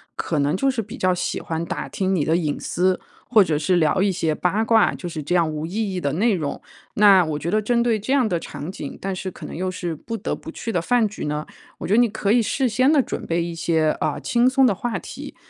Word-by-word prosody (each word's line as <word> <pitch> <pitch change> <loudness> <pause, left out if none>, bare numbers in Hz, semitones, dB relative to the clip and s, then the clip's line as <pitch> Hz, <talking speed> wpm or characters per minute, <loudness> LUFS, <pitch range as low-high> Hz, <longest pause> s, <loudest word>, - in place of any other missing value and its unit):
可 155 - -2
能 145 +3 +1
就 270 +8 +2
是 250 -3 -2
比 215 +1 -9
较 185 0 +2
喜 180 - -2
欢 165 0 -3
打 - - -4
听 190 0 -1
你 160 - +1
的 160 - +2
隐 155 -4 -1
私， 185 +1 0 0.3
或 220 -4 +6
者 160 -5 0
是 170 +4 +1
聊 170 +2 +2
一 200 0 +3
些 165 -4 0
八 185 +7 0
卦， 225 0 +4
就 175 - -6
是 160 -2 -5
这 150 +5 -1
样 165 -3 +2
无 155 0 -4
意 205 +2 -2
义 180 - -3
的 140 -3 -1
内 215 +7 +2
容。 155 -6 -3 0.4
那 200 -3 +7
我 155 -2 -2
觉 165 - -3
得 215 +1 +2
针 235 +3 +1
对 230 -2 +1
这 215 +6 -4
样 265 -5 +3
的 175 -5 0
场 160 +1 -7
景， - - -7
但 195 0 -3
是 185 +1 -4
可 - - -10
能 - - -7
又 185 +3 -2
是 175 -2 -4
不 230 +9 -6
得 215 - -3
不 - - -9
去 230 - -5
的 175 - 0
饭 235 +4 +2
局 210 - -6
呢， 150 +1 -2 0.3
我 - - -5
觉 195 - +1
得 225 - +5
你 240 - +5
可 200 -1 -1
以 240 +2 +5
事 260 +4 0
先 255 +6 +3
地 300 -3 +5
准 - - -5
备 170 0 0
一 170 0 -4
些， 160 -2 +1
呃， - - -1
轻 240 +1 +3
松 265 0 +4
的 220 - +3
话 230 +5 -3
题， - - -9
185 Hz, 295 characters per minute, -22 LUFS, 165-225 Hz, 0.4 s, 那